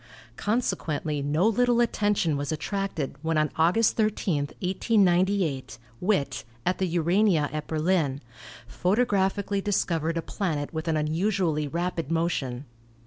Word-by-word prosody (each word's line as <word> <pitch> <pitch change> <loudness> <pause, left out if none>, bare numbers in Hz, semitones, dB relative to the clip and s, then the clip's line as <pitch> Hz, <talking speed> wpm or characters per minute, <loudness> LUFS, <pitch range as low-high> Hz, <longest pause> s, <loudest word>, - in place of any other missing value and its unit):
Consequently 165 - -1
no 150 +8 +2
little 240 +2 +3
attention 205 -8 +1
was 145 +1 -3
attracted 190 -3 -3
when 160 0 0
on 155 -1 +1
August 180 +8 +3
13, 195 -9 +1
1898, 185 - +1 0.2
Witt, 160 -9 0 0.2
at 185 - 0
the 190 - +1
Urania 175 -1 +2
at 155 -1 -4
Berlin, 155 -3 +1 0.5
photographically 200 -1 0
discovered 165 -5 0
a 165 - -2
planet 160 -8 -3
with 160 +1 -4
an 160 -1 +1
unusually 160 0 0
rapid 170 -1 -2
motion. 150 -6 -1
170 Hz, 120 wpm, -26 LUFS, 155-200 Hz, 0.5 s, little